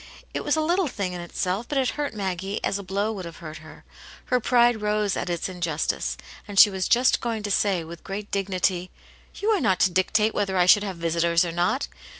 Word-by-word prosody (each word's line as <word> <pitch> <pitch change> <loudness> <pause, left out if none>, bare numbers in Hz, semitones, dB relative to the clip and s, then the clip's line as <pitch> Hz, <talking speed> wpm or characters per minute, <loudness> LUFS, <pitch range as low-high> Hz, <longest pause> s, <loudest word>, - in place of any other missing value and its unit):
It - - -3
was 295 - +1
a 315 - +1
little 345 +3 +1
thing 200 -8 -3
in 175 - -5
itself, 185 +5 -3
but 290 - -2
it 260 -2 +2
hurt 290 -6 -3
Maggie 195 0 -3
as 195 - 0
a - - -7
blow 200 +3 -1
would 195 -5 -6
have 165 -1 -9
hurt 155 -1 -8
her; 155 0 -14 0.4
her 250 - +1
pride 240 -2 +3
rose 210 -1 0
at 175 - -3
its 170 -1 -2
injustice, 170 -4 -2 0.3
and 205 -1 -8
she 205 +1 +9
was 190 -1 -2
just 245 +2 +3
going 225 -3 -3
to 205 - -3
say, 195 -4 +1
with 165 +1 -10
great 200 +1 -6
dignity: 185 -2 0 0.5
"You 420 - -2
are 420 -5 +2
not 185 - +2
to 190 - +4
dictate 210 +4 +2
whether 195 -2 -1
I 180 - +4
should 200 +3 +6
have 195 -3 -4
visitors 170 +1 +1
or 170 - -3
not!" 175 +11 0
195 Hz, 225 wpm, -25 LUFS, 175-220 Hz, 0.5 s, she